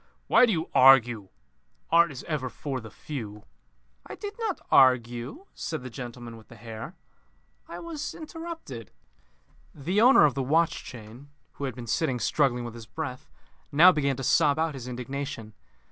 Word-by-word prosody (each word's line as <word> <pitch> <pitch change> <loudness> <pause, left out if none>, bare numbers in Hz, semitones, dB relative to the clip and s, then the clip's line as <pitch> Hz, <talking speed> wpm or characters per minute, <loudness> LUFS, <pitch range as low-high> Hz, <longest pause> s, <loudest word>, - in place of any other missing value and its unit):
"Why 250 - +5
do - - +1
you 165 -4 -1
argue? 120 -6 +5 0.6
Art 170 0 +5
is 130 - -8
ever 145 -6 -3
for 135 0 -5
the 110 - -10
few." 105 -4 -7 0.6
"I - - -9
did 410 0 -6
not 435 -5 -2
argue," 125 - +3
said 160 -5 -5
the 130 - -8
gentleman 120 -2 -8
with 110 - -16
the 115 - -14
hair. 110 0 -9 0.7
"I 170 - -8
was 315 - -6
interrupted." 325 - -8 0.9
The 180 +9 0
owner 250 - +7
of 145 - +2
the 135 - -2
watch 160 +6 +1
chain, 120 +3 -11 0.2
who 140 - -6
had 130 - -4
been 120 -2 -8
sitting 125 +2 0
struggling 125 -2 +1
with 120 - -7
his 115 -2 -11
breath, 125 +3 -6 0.4
now 170 +6 +8
began 140 -5 0
to 135 - -5
sob 145 +2 +3
out 160 -1 0
his 130 -3 -8
indignation. 125 -2 -6
135 Hz, 165 wpm, -27 LUFS, 120-160 Hz, 0.9 s, now